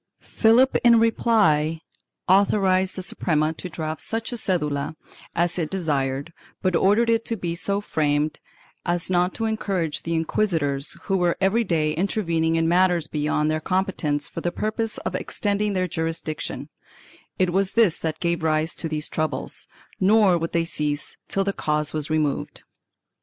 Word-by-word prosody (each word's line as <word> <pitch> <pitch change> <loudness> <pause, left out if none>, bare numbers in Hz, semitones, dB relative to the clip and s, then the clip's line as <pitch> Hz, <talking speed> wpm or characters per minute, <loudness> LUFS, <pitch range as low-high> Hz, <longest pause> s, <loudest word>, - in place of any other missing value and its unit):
Philip 245 +4 +4
in 235 -1 +7
reply 165 -9 +2 0.5
authorized 190 -1 +3
the 185 - -4
Suprema 155 -4 0
to 180 - -7
draft 155 -2 -4
such 225 +2 -3
a - - -2
cedula 155 -8 -1 0.4
as 175 +1 0
it 160 -3 -1
desired 145 -4 -2 0.3
but 185 -2 +2
ordered 205 +7 +3
it 230 0 +2
to 230 - -2
be 175 -3 -3
so 200 +4 -1
framed 150 -4 0 0.4
as 175 +1 -1
not 180 0 +2
to 225 - -2
encourage 195 -7 -1
the 165 0 -2
inquisitors, 160 -5 0
who 195 -2 0
were 175 -2 +1
every 195 +5 +2
day 155 -6 0
intervening 165 -2 0
in 165 0 +2
matters 175 -1 +3
beyond 150 0 0
their 155 - 0
com 185 +4 +1
petence 145 -6 -2
for - - -7
the 175 - -1
purpose 215 +2 -2
of - - -4
extending 205 0 -1
their 185 -1 0
jurisdiction; 160 -1 -4 0.7
it 185 -2 +1
was 195 0 +1
this 220 -8 +3
that 160 -1 -3
gave 170 -1 0
rise 160 +1 +1
to 165 - -4
these 155 -1 -2
troubles, 155 0 -2 0.3
nor 200 -1 +5
would 165 -1 -2
they 170 -1 +1
cease 150 -3 -3
till 195 - +1
the 200 0 -1
cause 150 -3 0
was 155 -1 -2
removed. 155 -3 -1
170 Hz, 165 wpm, -24 LUFS, 155-195 Hz, 0.7 s, in